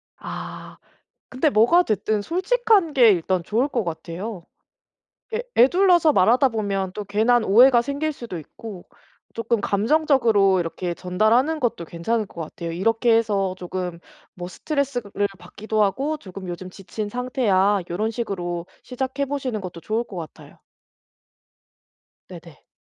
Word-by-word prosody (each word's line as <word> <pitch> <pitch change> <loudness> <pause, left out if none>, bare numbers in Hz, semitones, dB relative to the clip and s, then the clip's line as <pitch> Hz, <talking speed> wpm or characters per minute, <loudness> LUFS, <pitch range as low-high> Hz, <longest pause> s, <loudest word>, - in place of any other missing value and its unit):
아. - - -8 0.5
근데 260 +4 +1
뭐가 285 +10 +4
됐든 215 0 0
솔직한 390 - +2
게 245 -5 +6
일단 185 0 +1
좋을 235 - 0
것 235 -7 -1
같아요. 170 +3 -6 0.9
에 465 - -1
에둘러서 345 +3 +5
말하다 245 +7 +4
보면 200 -4 -2
또 210 - -5
괜한 220 +4 +2
오해가 240 +4 +6
생길 285 +5 -2
수도 235 -10 -7
있고 185 +5 -10 0.5
쪼끔 230 -1 -1
감정적으로 220 - +3
이렇게 175 +1 -4
전달하는 220 - +1
것도 235 -9 -1
괜찮을 210 +8 -2
것 180 - -13
같아요. 165 +1 -6
"이렇게 225 +6 +2
해서 200 -4 0
쪼금 180 -1 -5 0.3
뭐 175 -1 -7
스트레스를 245 - -2
받기도 210 +5 -2
하고 270 +10 0
쪼금 190 -6 -10
요즘 175 +1 -6
지친 205 +3 -6
상태야." 210 -5 +1
요런 215 +6 -1
식으로 175 -7 -4 0.2
시작해 265 +2 -3
보시는 260 -5 -3
것도 180 -3 -8
좋을 220 +7 -2
것 200 - -11
같아요. 160 -3 -10 1.7
네네. - - -13
215 Hz, 295 characters per minute, -23 LUFS, 185-255 Hz, 1.7 s, 게